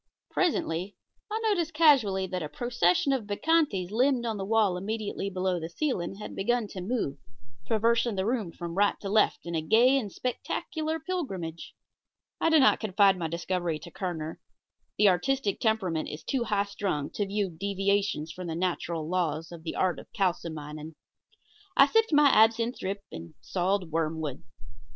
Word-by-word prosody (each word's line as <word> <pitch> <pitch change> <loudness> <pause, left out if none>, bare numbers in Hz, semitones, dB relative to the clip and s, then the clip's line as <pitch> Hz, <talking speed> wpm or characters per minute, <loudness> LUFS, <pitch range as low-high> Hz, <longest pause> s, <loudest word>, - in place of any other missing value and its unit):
Presently 195 - 0 0.3
I 435 +1 -2
noticed 345 -8 0
casually 250 - +4
that 185 -1 -4
a 150 - -4
procession 240 - +1
of 240 -6 -2
bacchantes 205 - +1
limned 250 +2 +2
on 225 -2 -2
the 195 - -3
wall 210 -3 +2
immediately 205 +1 -3
below 185 -1 -1
the 165 0 -5
ceiling 195 - -2
had 210 - -8
begun 240 +3 +1
to 185 - -7
move, 180 - -2 0.5
traversing 230 0 +2
the 190 0 -1
room 220 -6 -1
from 170 0 -6
right 200 +3 +2
to 195 - -4
left 210 -3 +2
in 170 - -5
a 160 - 0
gay 240 - +4
and 210 -6 -5
spectacular 315 - -3
pilgrimage. 195 - -5 0.6
I - - +3
did 320 -2 +6
not 265 - +5
confide 200 -2 +4
my 170 -3 -3
discovery 170 0 -2
to 155 - -11
Kerner. 165 -4 -4 0.6
The 210 - +5
artistic 205 +4 0
temperament 190 -8 0
is 150 - -8
too 255 -3 -1
high 205 -2 +1
strung 195 -8 -3
to 205 - -2
view 200 -1 -1
such 160 - -17
deviations 195 -4 0
from 180 +1 -7
the 165 - -3
natural 170 -2 -2
laws 165 -2 -1
of 170 -2 -9
the 160 - -5
art 185 -2 +1
of - - -14
kalsomining. 160 -5 -3 0.8
I - - +9
sipped 450 -2 +2
my 295 -1 +6
absinthe 230 +2 +3
drip 200 +1 -4
and 80 0 -9
sawed 185 -1 -1
wormwood. 160 -3 -2
195 Hz, 170 wpm, -28 LUFS, 170-235 Hz, 0.8 s, I